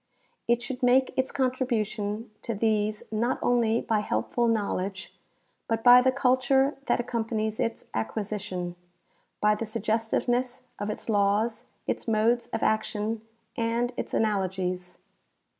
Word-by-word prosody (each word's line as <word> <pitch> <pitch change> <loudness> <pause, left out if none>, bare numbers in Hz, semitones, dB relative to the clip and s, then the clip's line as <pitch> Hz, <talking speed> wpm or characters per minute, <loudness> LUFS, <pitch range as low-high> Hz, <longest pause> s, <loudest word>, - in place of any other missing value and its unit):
It 240 +1 +2
should 265 -1 -5
make 255 +1 +4
its 260 0 0
contribution 230 -5 -1
to 230 - -3
these 215 0 +1
not 235 +4 0
only 235 -2 +2
by 220 -2 +1
helpful 235 +3 0
knowledge, 200 -3 -1 0.5
but 225 0 -1
by 245 0 +9
the 260 +1 +3
culture 265 +1 +3
that - - +2
accompanies 225 -2 -2
its 230 - -2
acquisition, 185 - -3 0.7
by 210 0 +5
the 225 +1 -3
suggestiveness 230 +3 -1 0.2
of 205 +1 -2
its 215 - -5
laws, 215 +3 +1 0.2
its - - -3
modes 230 +2 +2
of 225 - -3
action, 215 0 0 0.3
and 235 +2 0
its - - -4
analogies. 185 -4 -1
225 Hz, 125 wpm, -27 LUFS, 210-245 Hz, 0.7 s, by